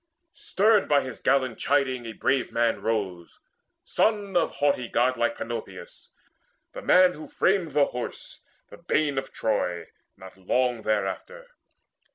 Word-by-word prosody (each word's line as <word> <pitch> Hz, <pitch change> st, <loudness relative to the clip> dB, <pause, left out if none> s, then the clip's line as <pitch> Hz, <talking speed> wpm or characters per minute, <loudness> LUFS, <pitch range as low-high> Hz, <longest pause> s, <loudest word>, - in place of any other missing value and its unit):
Stirred 210 Hz, +1 st, +2 dB
by 145 Hz, -1 st, +4 dB
his 130 Hz, -3 st, -7 dB
gallant 130 Hz, -4 st, +1 dB
chiding, 130 Hz, -4 st, 0 dB
a 115 Hz, -, -6 dB
brave 130 Hz, +3 st, 0 dB
man 115 Hz, -1 st, 0 dB
Rose, 95 Hz, -6 st, -3 dB, 0.4 s
son 205 Hz, -3 st, 0 dB
of 175 Hz, -, +2 dB
haughty 140 Hz, -4 st, +1 dB
godlike 130 Hz, -, +1 dB
Panopeus, 485 Hz, +9 st, -7 dB, 0.6 s
The -, -, -7 dB
man 185 Hz, -, +5 dB
who 155 Hz, -, -10 dB
framed 185 Hz, -6 st, 0 dB
the 145 Hz, -1 st, +4 dB
Horse, 125 Hz, -2 st, -7 dB, 0.3 s
the -, -, -12 dB
bane 145 Hz, -3 st, 0 dB
of 135 Hz, -, -9 dB
Troy, 90 Hz, -6 st, -2 dB, 0.3 s
Not 95 Hz, 0 st, -13 dB
long 120 Hz, +5 st, 0 dB
thereafter. 110 Hz, -, -3 dB
135 Hz, 135 wpm, -26 LUFS, 115-180 Hz, 0.6 s, man